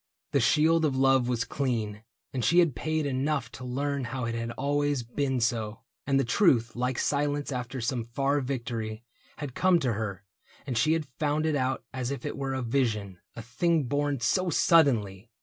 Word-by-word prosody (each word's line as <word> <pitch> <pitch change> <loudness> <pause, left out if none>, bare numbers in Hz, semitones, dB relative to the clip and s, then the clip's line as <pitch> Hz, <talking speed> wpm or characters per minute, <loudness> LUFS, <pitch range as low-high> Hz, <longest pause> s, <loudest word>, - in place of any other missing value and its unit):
The - - +3
shield 160 +2 +3
of 145 -4 +1
love 135 -2 +4
Was 120 -1 0
clean, 110 -6 -2 0.3
and 130 -3 -2
she 170 +10 +3
had 170 -7 +4
paid 155 +5 -1
enough 135 -2 -1
to 130 - -9
learn 140 +2 -2
How 125 0 -3
it 115 - -2
had 115 0 -3
always 145 0 0
been 130 +2 -1
so. 115 -2 -1 0.3
And 135 -1 +3
the - - +3
truth, 120 - +3
Like 125 +1 -1
silence 145 0 0
after 125 0 -4
some 115 +1 -1
far 135 +5 0
victory. 115 -4 -4 0.3
Had 145 -4 -6
come 185 +3 +4
to 125 -3 +1
her, 100 -3 -4 0.4
and 130 -3 -3
she 155 +8 +3
had 165 -2 -1
found 150 +1 +1
it 155 -2 +1
out 130 -3 -1
As 130 -2 -3
if 140 +3 -5
it 145 - -3
were 135 -1 -3
a 130 - -2
vision, 110 -7 -1 0.2
a 115 - -7
thing 155 +8 +1
born 145 +1 -1
So 180 +10 +1
suddenly 120 - +3
130 Hz, 190 wpm, -28 LUFS, 115-145 Hz, 0.4 s, love